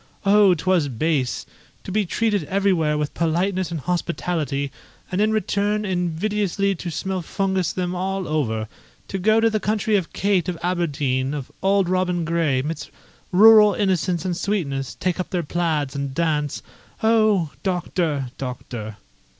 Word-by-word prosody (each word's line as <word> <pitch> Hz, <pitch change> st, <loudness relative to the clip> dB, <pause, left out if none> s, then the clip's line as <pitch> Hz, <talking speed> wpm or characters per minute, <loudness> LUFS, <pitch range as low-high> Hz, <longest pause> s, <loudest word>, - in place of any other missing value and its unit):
Oh, 200 Hz, -2 st, +6 dB
'twas 175 Hz, -1 st, +1 dB
base! 135 Hz, 0 st, -1 dB, 0.4 s
to -, -, -7 dB
be 205 Hz, -1 st, +1 dB
treated 210 Hz, -2 st, 0 dB
everywhere 180 Hz, -5 st, +1 dB
with 150 Hz, -1 st, -2 dB
politeness 175 Hz, +2 st, 0 dB
and 170 Hz, -2 st, -3 dB
hospitality, 165 Hz, -4 st, -2 dB, 0.4 s
and 185 Hz, +2 st, 0 dB
in 215 Hz, +1 st, +3 dB
return 210 Hz, 0 st, 0 dB
invidiously 195 Hz, +2 st, 0 dB
to 175 Hz, -1 st, -6 dB
smellfungus 190 Hz, +1 st, -1 dB
them 180 Hz, -1 st, -2 dB
all 190 Hz, +1 st, -2 dB
over; 110 Hz, -8 st, -1 dB, 0.4 s
to 195 Hz, -, -2 dB
go 215 Hz, +4 st, +4 dB
to 225 Hz, -, +4 dB
the 215 Hz, -1 st, +1 dB
country 210 Hz, +1 st, 0 dB
of 180 Hz, -4 st, -3 dB
Kate 190 Hz, -3 st, +1 dB
of 175 Hz, -, -3 dB
Aberdeen, 145 Hz, -6 st, 0 dB
of 140 Hz, -3 st, -6 dB
Auld 195 Hz, -1 st, +3 dB
Robin 180 Hz, -2 st, 0 dB
Gray, 160 Hz, -6 st, +1 dB
'midst 150 Hz, 0 st, -5 dB, 0.4 s
rural 210 Hz, +1 st, +7 dB
innocence 185 Hz, -3 st, 0 dB
and 180 Hz, -2 st, -1 dB
sweetness, 160 Hz, -8 st, -2 dB
take 185 Hz, -1 st, -1 dB
up 185 Hz, -, -3 dB
their 180 Hz, -2 st, -1 dB
plaids, 155 Hz, -4 st, -1 dB
and 140 Hz, -1 st, -3 dB
dance. 150 Hz, -3 st, -1 dB, 0.4 s
Oh! 215 Hz, -8 st, +3 dB
Doctor, 170 Hz, -7 st, -1 dB
Doctor!" 120 Hz, -4 st, -6 dB
180 Hz, 145 wpm, -22 LUFS, 150-195 Hz, 0.4 s, rural